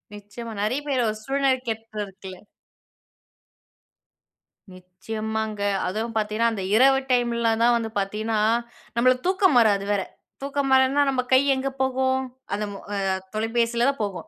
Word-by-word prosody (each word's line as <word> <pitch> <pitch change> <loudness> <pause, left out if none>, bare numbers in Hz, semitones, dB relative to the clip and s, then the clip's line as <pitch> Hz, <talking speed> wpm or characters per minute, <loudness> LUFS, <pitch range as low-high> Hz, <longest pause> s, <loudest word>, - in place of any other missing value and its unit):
நிச்சயமா. 210 +3 -9
நெறைய 235 +7 0
பேரு 265 -3 +1
ஒரு 215 - -4
சூழ்நிலகேப்ப 250 -5 -1
இருக்குல. 190 -1 -11 2.4
நிச்சயமாங்க. 215 +4 -5 0.3
அதுவும் 220 +5 -3
பாத்தீங்கன்னா, 215 +2 +1
அந்த 200 -3 -4
இரவு 270 +3 +5
டைம்ல 235 -2 +2
தான் 240 0 +5
வந்து 225 -1 -3
பாத்தீங்கன்னா, 215 +2 -2 0.6
நம்மளுக்கு 255 +3 +2
தூக்கம் 375 -6 +3
வராது 205 -4 +3
வேற. 200 -1 +1 0.4
தூக்கம் 275 0 -2
வரானா, 265 +2 +4
நம்ப 260 -2 +1
கை 260 - +7
எங்க 265 +1 -2
போகும். 260 0 +1 0.3
அந்த 210 +1 -1
மொ - - -7 0.2
அ - - -1 0.4
தொலைபேசியிலதா 235 +4 +1
போகும். 200 -3 -5
230 Hz, 125 wpm, -24 LUFS, 215-260 Hz, 2.4 s, கை